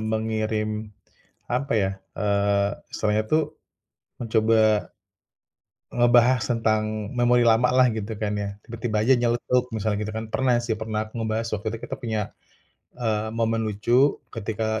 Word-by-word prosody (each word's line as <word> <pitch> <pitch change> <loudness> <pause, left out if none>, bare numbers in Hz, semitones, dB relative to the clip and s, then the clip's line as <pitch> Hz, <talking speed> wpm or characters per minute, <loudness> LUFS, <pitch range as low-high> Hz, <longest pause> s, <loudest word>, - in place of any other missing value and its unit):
mengirim, 110 -1 -2 0.6
apa 140 +2 -1
ya, 100 -3 +2 0.2
eee, 100 -1 +1 0.2
istilahnya 105 0 +1
tuh 155 +7 +3 0.8
mencoba 110 -3 +3 1.0
ngebahas 120 +1 +4
tentang 110 -2 0
memori 120 0 +4
lama 115 +1 +4
lah, 130 0 +6
gitu 110 0 -4
kan, 105 0 -2
ya. 100 -1 -2
Tiba-tiba 115 -2 -2
aja 125 +5 +4
nyeletuk, 120 +1 +1
misalnya 105 -1 -1
gitu 110 - -5
kan. 110 0 -3
Pernah 130 +1 +2
sih, 115 -2 -2
pernah, 110 0 -3
aku 115 - -7
ngebahas 110 0 -1
waktu 105 +1 -4
itu - - -5
kita - - -3
punya, 110 -3 -2 0.8
eee, 110 -3 -1
momen 115 0 +1
lucu 120 +7 +2 0.2
ketika 110 0 -2
110 Hz, 140 wpm, -24 LUFS, 110-120 Hz, 1.0 s, lah